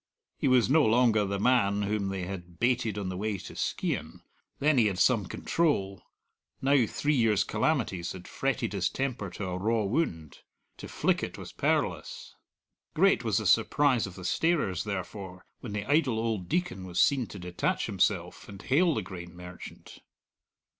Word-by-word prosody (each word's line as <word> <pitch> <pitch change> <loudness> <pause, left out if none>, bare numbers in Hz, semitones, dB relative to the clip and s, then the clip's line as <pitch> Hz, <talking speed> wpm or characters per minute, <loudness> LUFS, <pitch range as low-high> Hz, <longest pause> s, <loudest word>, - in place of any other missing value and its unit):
He - - +1
was 130 -3 +4
no 150 +4 +4
longer 110 -2 +3
the 100 0 -2
man 105 -3 +2
whom 100 -1 -1
they 95 -1 -3
had 90 -2 -8
baited 120 -3 +1
on 100 -2 -3
the 90 - -4
way 105 +1 -2
to - - -10
Skeighan; - - -3 0.4
then 145 -1 +3
he 110 - +4
had 95 -3 -2
some 105 -1 +3
control, 100 - 0 0.6
now 135 -3 +3
three 150 +7 0
years' 110 -6 +3
calamities 110 - -1
had 90 -1 -10
fretted 130 -4 -2
his 95 -3 0
temper 125 -7 -3
to 95 +3 -6
a 90 0 -3
raw 110 +2 +1
wound. 90 - -2 0.4
To - - -8
flick - - 0
it - - -5
was - - -9
perilous. - - -1 0.6
Great - - +4
was - - +1
the - - -1
surprise 135 -7 +3
of 90 - -10
the 90 - -9
starers, 150 - +1
therefore, 95 -1 -6
when 115 -5 -7
the 105 -1 -3
idle 145 -5 +2
old 110 -6 -2
Deacon 180 - -1
was 90 -2 -4
seen 135 -5 +3
to - - -9
detach 90 -1 -2
himself - - -1
and 100 -1 -10
hail 155 - +2
the 110 - -2
grain 90 -1 -9
merchant. 90 0 -11
105 Hz, 175 wpm, -29 LUFS, 95-130 Hz, 0.6 s, was